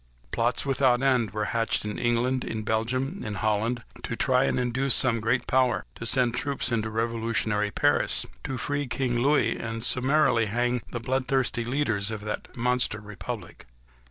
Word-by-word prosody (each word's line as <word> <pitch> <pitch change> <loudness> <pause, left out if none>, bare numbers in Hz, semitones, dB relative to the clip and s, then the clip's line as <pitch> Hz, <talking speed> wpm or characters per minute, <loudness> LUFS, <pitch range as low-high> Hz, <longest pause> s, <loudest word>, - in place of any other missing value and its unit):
Plots 120 +3 0
without 130 -2 +2
end 125 -5 +3
were 105 +2 -2
hatched 115 -2 0
in 105 - -4
England, 120 +2 +1
in 110 -1 -4
Belgium, 130 - -1
in 105 -1 -4
Holland, 110 +3 0 0.2
to 120 - -4
try 130 +2 +2
and - - 0
induce 130 +2 +2
some 120 -3 +3
great 115 +3 0
power 130 -1 +2
to 115 - -5
send 125 -1 +3
troops 140 0 -1
into 110 -2 0
revolutionary 110 -2 -1
Paris, - - +2 0.2
to 135 - -3
free 145 +3 -2
King 125 -1 -1
Louis, 130 -3 +3
and 115 0 -4
to - - 0
summarily 130 -3 +3
hang 120 +3 0
the 120 - -4
bloodthirsty 130 0 0
leaders 120 -6 0
of 110 -2 -4
that 105 +3 -6
monster 125 -2 +1
republic. 105 -2 -8
120 Hz, 165 wpm, -26 LUFS, 110-130 Hz, 0.2 s, end